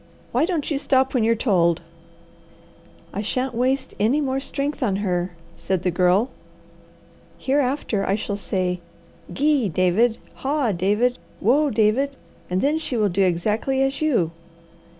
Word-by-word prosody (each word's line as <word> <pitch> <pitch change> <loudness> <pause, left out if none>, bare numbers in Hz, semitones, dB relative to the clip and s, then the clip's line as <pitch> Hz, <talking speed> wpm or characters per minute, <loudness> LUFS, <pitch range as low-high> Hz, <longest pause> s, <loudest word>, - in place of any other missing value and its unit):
"Why 260 +6 +2
don't 330 -5 -2
you 280 - 0
stop 265 -2 +2
when 250 -4 +2
you're 230 +1 +3
told?" 175 -7 +2 1.3
"I 200 - -2
shan't 255 +4 -2
waste 260 +3 0
any 230 +8 +3
more 270 -2 0
strength 280 +2 -3
on 210 -7 +1
her," 180 -1 -1 0.2
said 185 -2 -2
the 180 - +1
Girl. 180 +7 +2 1.1
"Hereafter 265 -6 0
I 195 - +2
shall 205 -1 -3
say, 185 -3 -1 0.5
'Gee, 275 +1 +2
David,' 185 +7 +2 0.2
'Haw, 275 -4 0
David,' 210 +7 +1 0.2
'Whoa, 285 +8 +3
David,' 235 +5 +2 0.3
and 180 +1 0
then 300 +3 +2
she 270 -6 -3
will 210 -2 +2
do 190 +2 0
exactly 215 +9 +1
as 270 +2 -1
you." 235 - +2
230 Hz, 145 wpm, -23 LUFS, 190-270 Hz, 1.3 s, you're